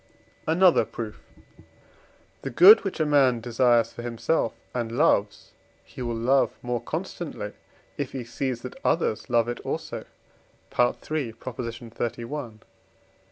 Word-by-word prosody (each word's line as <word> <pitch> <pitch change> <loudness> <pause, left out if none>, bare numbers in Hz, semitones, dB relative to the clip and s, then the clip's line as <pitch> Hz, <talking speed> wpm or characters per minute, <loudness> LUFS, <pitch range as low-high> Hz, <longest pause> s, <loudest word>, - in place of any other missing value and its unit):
Another 175 +2 +5
Proof. 110 -2 -7 1.2
The 135 - -4
good, 190 - +8
which 195 -3 -4
a 155 - +2
man 135 -5 +4
desires 120 -1 +2
for - - -7
himself 120 +2 0 0.2
and 120 -2 -2
loves, 105 -6 +1 0.3
he - - -10
will 120 -1 -2
love 130 +4 +3
more 120 -1 -2
constantly, - - -5 0.5
if - - -2
he 130 -2 -5
sees 120 0 -3
that 125 - -8
others 110 +3 0
love 120 -1 +3
it 120 - -3
also - - -4 0.7
(III. 125 0 +3 0.4
xxxi.) 120 +1 -5
120 Hz, 120 wpm, -26 LUFS, 115-135 Hz, 1.2 s, good